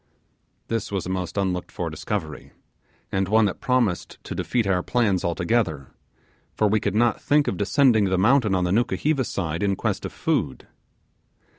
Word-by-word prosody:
This 115 -2 -3
was 95 -4 -2
a - - -5
most 90 -1 -4
unlooked 95 -2 -1
for 85 -3 -4
discovery, 80 0 -5 0.6
and 95 0 0
one 110 +2 +4
that 95 - -2
promised 120 -9 0
to - - -6
defeat 120 -3 -1
our 95 -2 +1
plans 105 -4 +1
altogether, 85 - -1 0.6
for 105 - +2
we 105 +1 +2
could 100 0 -2
not 115 0 +2
think 145 0 +2
of - - 0
descending 110 +3 +3
the 95 -1 +1
mountain 110 0 +3
on 90 - +1
the 90 - 0
Nukuheva 130 +6 +1
side 85 -7 -3
in 100 -1 +1
quest - - -2
of - - -5
food. - - -2
100 Hz, 170 wpm, -24 LUFS, 90-115 Hz, 0.6 s, one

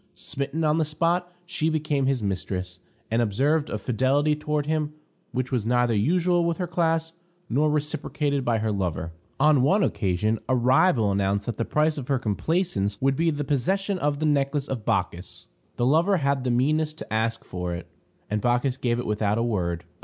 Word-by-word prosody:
Smitten 140 +4 -3
on 155 +1 +2
the - - +3
spot, 170 +4 0
she 170 -3 -1
became 150 -3 0
his 135 -4 0
mistress, 90 -2 -3 0.3
and 115 +1 +2
observed 140 +8 +1
a - - -2
fidelity 130 +7 +1
toward 150 -1 -2
him 150 -1 -1 0.4
which 130 0 -2
was 125 -5 0
neither 120 +1 +2
usual 175 - +2
with 170 -1 0
her 180 - -1
class, 165 -1 0 0.4
nor 150 +5 +3
reciprocated 150 -1 -1
by 120 -2 +1
her 110 0 -1
lover. 90 -5 -2 0.3
On 150 -1 +5
one 190 +10 +3
occasion, 105 - 0
a 130 - +3
rival 125 - +3
announced 100 +1 0
that 120 - -4
the 115 - -1
price 150 0 +1
of 130 - -7
her 135 - +2
complaisance 110 - -1
would 135 0 +2
be 165 +3 +2
the 145 -2 -2
possession 185 +8 0
of 145 -2 0
the 155 - -1
necklace 145 -1 +1
of 120 -5 -4
Bacchis. 90 -1 -2 0.3
The 120 - 0
lover 165 +9 +3
had 140 -3 0
the - - +1
meanness 150 +6 +1
to 155 - -8
ask 115 +1 -1
for 90 -1 -4
it, 85 - -7 0.4
and 105 0 -1
Bacchis 125 +2 +1
gave 120 -3 0
it 120 - -3
without 105 0 0
a 115 - +1
word. 90 -7 -1
135 Hz, 190 wpm, -25 LUFS, 110-155 Hz, 0.4 s, On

